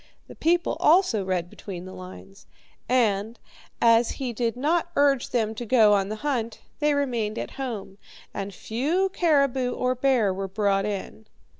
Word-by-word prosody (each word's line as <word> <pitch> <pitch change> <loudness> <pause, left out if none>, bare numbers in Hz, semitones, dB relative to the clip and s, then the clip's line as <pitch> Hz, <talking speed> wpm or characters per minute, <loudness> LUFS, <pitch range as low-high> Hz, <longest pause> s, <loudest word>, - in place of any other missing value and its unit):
The - - -11
people 345 +2 +1
also 310 - +4
read 185 -2 -1
between 180 -1 -9
the 185 - -9
lines, 185 +1 -12 0.4
and, 225 -3 +1 0.4
as 230 0 +4
he 255 -3 -4
did 230 +1 -2
not 330 +6 +1
urge 280 -3 +2
them 220 -3 0
to 225 - -6
go 220 -3 +5
on 195 -1 +1
the 215 - -3
hunt, 235 -6 -2 0.2
they 295 -1 +2
remained 235 -6 -1
at - - -4
home, 220 -7 -6 0.3
and 200 0 -4
few 290 - -1
caribou 275 -6 +2
or 255 0 0
bear 250 -6 +2
were 195 +1 -4
brought 195 0 0
in. 210 +2 -6
230 Hz, 160 wpm, -25 LUFS, 200-270 Hz, 0.4 s, go